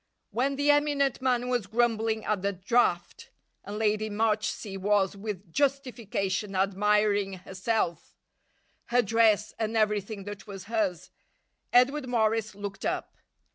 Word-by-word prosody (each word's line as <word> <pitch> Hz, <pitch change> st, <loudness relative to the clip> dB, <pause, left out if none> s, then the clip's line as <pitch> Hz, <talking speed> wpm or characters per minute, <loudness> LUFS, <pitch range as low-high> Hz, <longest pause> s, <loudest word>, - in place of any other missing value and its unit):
When 270 Hz, +4 st, 0 dB
the 285 Hz, +1 st, +3 dB
eminent 290 Hz, -3 st, +1 dB
man 250 Hz, -1 st, +1 dB
was 245 Hz, -6 st, -1 dB
grumbling 225 Hz, 0 st, 0 dB
at 210 Hz, -3 st, 0 dB
the 200 Hz, +1 st, 0 dB
draught, 230 Hz, -, 0 dB, 0.3 s
and 205 Hz, +1 st, -6 dB
Lady 215 Hz, 0 st, +1 dB
Marchsea 215 Hz, -1 st, -1 dB
was, 200 Hz, 0 st, +2 dB
with 200 Hz, -4 st, -7 dB
justification, 230 Hz, -8 st, -1 dB
admiring 200 Hz, +1 st, +2 dB
herself, 190 Hz, 0 st, -3 dB, 0.7 s
her 245 Hz, +1 st, +2 dB
dress, 215 Hz, -1 st, +3 dB
and 220 Hz, 0 st, -1 dB
everything 210 Hz, -1 st, 0 dB
that 205 Hz, +2 st, -8 dB
was 195 Hz, -2 st, -8 dB
hers, 205 Hz, -5 st, -2 dB, 0.6 s
Edward 260 Hz, +3 st, +3 dB
Morris 220 Hz, -2 st, +1 dB
looked 200 Hz, -1 st, -7 dB
up. -, -, -3 dB
215 Hz, 125 wpm, -28 LUFS, 200-240 Hz, 0.7 s, the